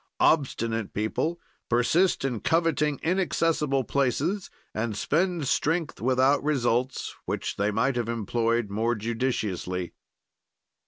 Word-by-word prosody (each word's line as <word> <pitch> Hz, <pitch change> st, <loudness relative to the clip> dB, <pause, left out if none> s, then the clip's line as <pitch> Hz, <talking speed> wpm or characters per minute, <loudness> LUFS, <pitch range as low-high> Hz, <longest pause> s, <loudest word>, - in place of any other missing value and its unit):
"Obstinate 115 Hz, -8 st, +1 dB
people 155 Hz, +11 st, -1 dB, 0.3 s
persist 135 Hz, +8 st, +2 dB
in 125 Hz, -5 st, -1 dB
coveting 160 Hz, -2 st, +1 dB
inaccessible 165 Hz, -6 st, +1 dB
places 140 Hz, -, 0 dB, 0.2 s
and 110 Hz, -1 st, -2 dB
spend 170 Hz, -, 0 dB
strength 160 Hz, +3 st, 0 dB
without 130 Hz, +3 st, +3 dB
results, 130 Hz, -3 st, 0 dB
which -, -, -3 dB
they 100 Hz, +1 st, +1 dB
might 120 Hz, +5 st, +1 dB
have 120 Hz, -2 st, -1 dB
employed 115 Hz, -1 st, 0 dB
more 115 Hz, +4 st, +1 dB
judiciously. 105 Hz, -6 st, -2 dB
130 Hz, 105 wpm, -27 LUFS, 115-150 Hz, 0.3 s, without